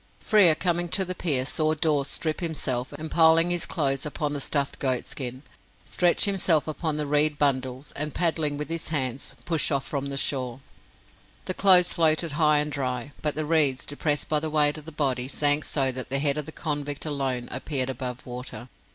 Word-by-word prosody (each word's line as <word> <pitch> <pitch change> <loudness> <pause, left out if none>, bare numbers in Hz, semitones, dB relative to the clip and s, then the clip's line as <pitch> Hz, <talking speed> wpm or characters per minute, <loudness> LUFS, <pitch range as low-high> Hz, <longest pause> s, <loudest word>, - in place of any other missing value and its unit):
Frere, 195 -7 +5
coming 175 0 0
to 190 +3 0
the 185 - -3
pier, 145 -8 0
saw 155 +2 0
Dawes 150 -3 0
strip 155 +1 -3
himself, 140 -6 -2
and 155 +2 -7
piling 165 +1 +4
his 175 -1 +1
clothes 135 -5 -1
upon 150 0 -3
the 145 - -3
stuffed 140 0 -1
goat 130 -3 -1
skin, 130 0 -6 0.4
stretch 175 -1 +2
himself 185 -6 +2
upon 155 0 -3
the 150 - -2
reed 150 +1 +2
bundles, 130 -1 -1
and, 150 +1 -3
paddling 160 -4 0
with 150 -1 -4
his 165 +1 -3
hands, 135 -4 -3
push 165 -3 +1
off 140 -2 -1
from 140 -1 -4
the 140 0 -4
shore. 130 -3 -1 0.9
The 185 - -2
clothes 185 -2 +5
floated 160 0 +2
high 150 0 +3
and 150 +1 -1
dry, 130 -1 -3
but 150 -1 -1
the 155 0 -2
reeds, 150 -4 +2
depressed 145 0 -1
by 150 - +2
the 155 +1 -2
weight 150 0 +2
of 150 - -14
the 160 - -7
body, 130 -4 -1
sank 145 +1 +3
so 135 -3 +1
that 130 0 -6
the 135 - +2
head 140 +1 +1
of 150 - -4
the - - -4
convict 145 -2 -4
alone 135 -5 -2
appeared 130 0 -1
above 125 -1 -6
water. 125 -1 -7
150 Hz, 195 wpm, -25 LUFS, 135-160 Hz, 0.9 s, Frere